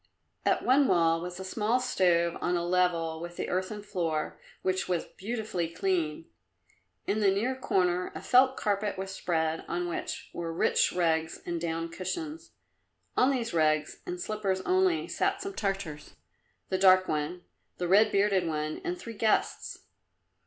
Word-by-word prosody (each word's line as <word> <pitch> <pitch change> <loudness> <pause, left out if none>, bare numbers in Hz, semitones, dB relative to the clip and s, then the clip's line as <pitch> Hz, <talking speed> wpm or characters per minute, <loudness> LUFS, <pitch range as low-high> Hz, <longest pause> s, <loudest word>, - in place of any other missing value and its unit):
At - - +2
one 270 +2 +5
wall 165 -2 +3
was 180 +1 -6
a - - -5
small 215 +5 0
stove 175 -9 +2
on 175 0 +1
a 170 - -2
level 170 -3 +1
with 175 0 -7
the - - -3
earthen 190 +3 -2
floor, 165 -6 -2 0.2
which 185 0 0
was 175 -2 0
beautifully 215 -5 -3
clean. 165 -3 -1 0.8
In 215 - 0
the 205 -2 +4
near 220 +7 0
corner 180 -7 0
a - - -5
felt 260 +1 +5
carpet 205 -1 -1
was 190 0 -4
spread 160 -3 -1
on 175 0 -2
which 170 - -5
were 170 -1 -4
rich 165 - +2
rugs 160 -2 0
and 170 -1 -3
down 165 0 -2
cushions. 300 - -5 0.6
On 255 - +4
these 245 -6 -1
rugs, 155 -2 +1
in 180 - -3
slippers 195 0 -2
only, 370 - +2
sat 390 0 0
some 395 0 -5
Tartars 195 - -4 0.5
the 185 - 0
dark 185 -1 +6
one, 155 +4 -2 0.3
the 175 - -2
red 205 +5 +5
bearded 195 -3 +2
one 155 -1 -2
and 355 0 -2
three 230 -9 -8
guests. 220 0 0
185 Hz, 160 wpm, -29 LUFS, 170-215 Hz, 0.8 s, dark